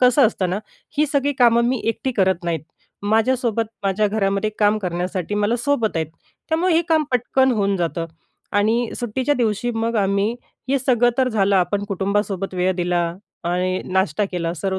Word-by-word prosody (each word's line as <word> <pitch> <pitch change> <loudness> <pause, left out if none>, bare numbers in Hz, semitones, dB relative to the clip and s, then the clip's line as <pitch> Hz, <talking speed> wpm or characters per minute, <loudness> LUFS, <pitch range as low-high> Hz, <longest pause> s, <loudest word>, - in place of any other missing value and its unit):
कसं 250 +1 +6
असतं 190 -4 -1
ना, 185 - -1 0.4
ही 300 - +4
सगळी 285 0 +2
कामं 235 -1 +5
मी 255 -2 0
एकटी 255 +4 -1
करत 190 -5 +1
नाहीत. 170 -2 -1 0.4
माझ्यासोबत, 225 +2 +1 0.2
माझ्या 200 +2 +1
घरामध्ये 200 0 0
काम 210 0 +3
करण्यासाठी 180 0 -3
मला 210 +3 +1
सोबत 235 -6 0
आहेत. 160 -1 0 0.4
त्यामुळे 330 +2 +2
हे 330 - +4
काम 320 -2 +3
पटकन 260 +1 +2
होऊन 200 -3 +1
जातं 170 -1 -2 0.5
आणि 225 +3 +1
सुट्टीच्या 255 +5 0
दिवशी 235 -1 0
मग 230 +1 -1
आम्ही 200 +2 +1 0.3
हे 275 +1 +2
सगळं 245 -2 +3
तर 260 -1 +3
झालं 200 -4 +2
आपण 190 +3 +1
कुटुंबासोबत 195 -1 -1
वेळ 180 +1 +1
दिला 175 -1 +1 0.4
आणि 180 +2 0
नाश्ता 190 +1 +1
केला, 170 -2 -1
सर्व 190 +3 -2
210 Hz, 165 wpm, -21 LUFS, 190-245 Hz, 0.5 s, कसं